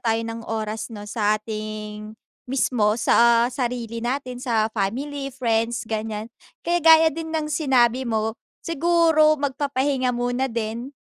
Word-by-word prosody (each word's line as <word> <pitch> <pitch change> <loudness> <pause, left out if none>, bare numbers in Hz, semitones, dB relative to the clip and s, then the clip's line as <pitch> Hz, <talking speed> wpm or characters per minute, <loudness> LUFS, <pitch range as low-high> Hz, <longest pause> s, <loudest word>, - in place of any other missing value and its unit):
tayo 225 -3 +1
ng 230 0 -5
oras 215 -1 -3
'no, 210 -3 -8
sa 210 0 +1
ating 215 0 -7 0.3
mismo, 240 -5 +1
sa 235 0 +4
sarili 240 -2 -3
natin, 250 +1 -3
sa 225 -3 0
family, 275 +7 -3
friends, 235 -3 -1
ganiyan. 220 0 -4 0.3
Kaya 345 +1 +1
gaya 320 0 +7
din 320 +2 -6
ng 310 -1 -2
sinabi 255 -4 +2
mo, 220 -1 0 0.3
siguro 330 -1 +3
magpapahinga 275 -2 -1
muna 245 +2 -1
din 230 +1 -4
240 Hz, 130 wpm, -23 LUFS, 220-275 Hz, 0.3 s, gaya